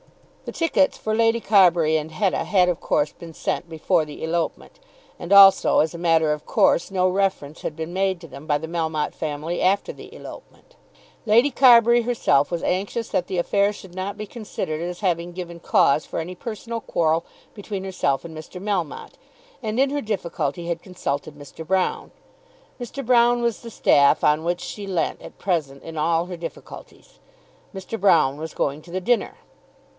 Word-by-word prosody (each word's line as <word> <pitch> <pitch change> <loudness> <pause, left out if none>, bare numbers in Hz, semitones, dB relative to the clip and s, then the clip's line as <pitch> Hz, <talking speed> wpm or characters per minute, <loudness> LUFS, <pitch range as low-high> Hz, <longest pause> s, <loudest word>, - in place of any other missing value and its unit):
The - - -5
tickets 330 -4 +2
for 215 - -3
Lady 230 +1 +3
Carbury 175 -7 +4
and 155 0 -2
Hetta 190 +3 0
had 185 -3 +3
of 175 -2 -1
course 150 0 0
been 165 -2 -12
sent 175 - -3
before 165 +1 +1
the 150 0 -9
elopement; 170 - -3 0.4
and 175 - -7
also, 200 -1 +7
as 160 +1 +1
a 170 - -7
matter 165 -3 +3
of 150 - -7
course, 170 - +2
no 185 -1 +1
reference 185 -6 -1
had 155 - -4
been 160 +2 -6
made 190 -1 0
to 170 - -11
them 145 +1 -12
by 145 -2 +2
the 160 +2 -7
Melmotte 160 -2 -2
family 155 +2 -4
after 190 +2 +1
the - - -13
elopement. - - -13 0.5
Lady 235 +7 +4
Carbury 240 -2 +6
herself 230 - +1
was 170 -1 -3
anxious 200 +5 -2
that 180 - -1
that 185 - -3
affair 200 +3 +2
should 190 -3 -12
not 190 +3 -5
be 215 - -5
considered 195 -8 -5
as 175 +2 -5
having 175 -3 -1
given 170 -1 -7
cause 150 -2 +3
for - - -6
any 170 +3 -5
personal 230 +3 -6
quarrel 165 -3 0 0.3
between 200 -2 -6
herself 170 -7 -1
and 165 -1 -9
Mr. 155 +4 -9
Melmotte, 190 -7 -4 0.4
and 220 0 -3
in 275 0 +3
her 290 0 -1
difficulty 175 - -3
had 170 -1 -3
consulted 150 -5 -4
Mr. 145 +2 -10
Broune. 185 +3 -1 0.7
Mr. 255 +3 -6
Broune 240 0 +4
was 235 -2 -1
the 230 - -9
staff 140 -8 +4
on 150 +1 +3
which 175 +1 -1
she 205 -2 -7
leant 180 -4 -2
at - - -12
present 150 -8 -2
in 165 - -9
all 165 +2 +1
her 180 0 -7
difficulties. 165 -1 -11 0.5
Mr. 195 +3 -6
Broune 160 -8 +4
was 160 +1 -7
going 145 +2 -1
to 170 - -15
the 185 - -2
dinner. 235 +5 0
175 Hz, 180 wpm, -23 LUFS, 160-205 Hz, 0.7 s, also